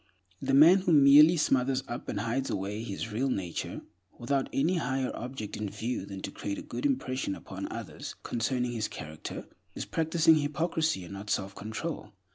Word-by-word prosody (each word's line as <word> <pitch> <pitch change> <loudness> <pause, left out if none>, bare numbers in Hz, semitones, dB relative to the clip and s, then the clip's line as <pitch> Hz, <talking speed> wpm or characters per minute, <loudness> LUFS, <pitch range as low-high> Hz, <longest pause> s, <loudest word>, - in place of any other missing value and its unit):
The 135 0 +1
man 165 +7 +8
who 180 -3 +1
merely 150 +4 +8
smothers 135 -3 +2
up 120 - -6
and 105 - -2
hides 120 +4 -1
away 100 +2 -3
his 110 0 -5
real 130 +6 0
nature, 95 -8 -3 0.4
without 135 +3 -1
any 165 +7 +1
higher 130 -3 -1
object 120 -4 -6
in 105 -1 -3
view 115 -1 -4
than 95 -1 -7
to - - -4
create 100 - -4
a - - -6
good 290 - -2
impression 130 - -1
upon - - -7
others - - -7
concerning 125 +1 -1
his 110 -3 -1
character, 75 0 -7 0.3
is - - -4
practicing 160 0 +3
hypocrisy 155 - 0
and 85 - -9
not 100 +1 -7
self 95 -1 -1
control. 110 +2 -5
125 Hz, 175 wpm, -29 LUFS, 105-150 Hz, 0.4 s, man